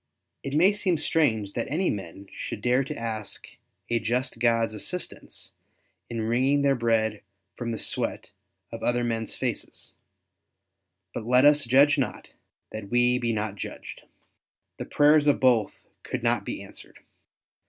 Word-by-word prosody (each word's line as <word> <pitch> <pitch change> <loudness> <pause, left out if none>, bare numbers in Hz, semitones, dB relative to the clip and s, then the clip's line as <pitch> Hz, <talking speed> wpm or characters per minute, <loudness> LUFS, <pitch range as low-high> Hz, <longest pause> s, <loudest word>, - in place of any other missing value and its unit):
It 135 +1 -4
may 185 +6 +5
seem 190 -4 +1
strange 115 -10 +1
that 115 - -2
any 175 +6 +1
men 95 -1 -7
should - - -6
dare 125 +3 +2
to 150 +2 -6
ask 110 -2 -5 0.4
a 120 - +1
just 120 +2 -2
God's 115 -2 +2
assistance 175 - -6 0.6
in 115 -1 -3
wringing 130 +5 +2
their 140 -1 +4
bread 115 -3 +1 0.3
from 120 -1 -4
the 115 - -3
sweat - - -4 0.4
of - - -7
other 120 0 +1
men's 115 -2 -2
faces; - - -4 1.2
but - - -4
let 125 +2 +5
us 145 -1 +5
judge 140 +4 +5
not, 130 - -3 0.4
that 110 -2 -7
we 120 +1 +3
be 120 -1 0
not 105 -2 -2
judged. - - -8 0.8
The - - -5
prayers 150 0 +4
of 145 - +4
both 120 -5 +3 0.3
could - - -4
not - - +1
be - - -5
answered. - - -12
120 Hz, 150 wpm, -26 LUFS, 110-140 Hz, 1.2 s, may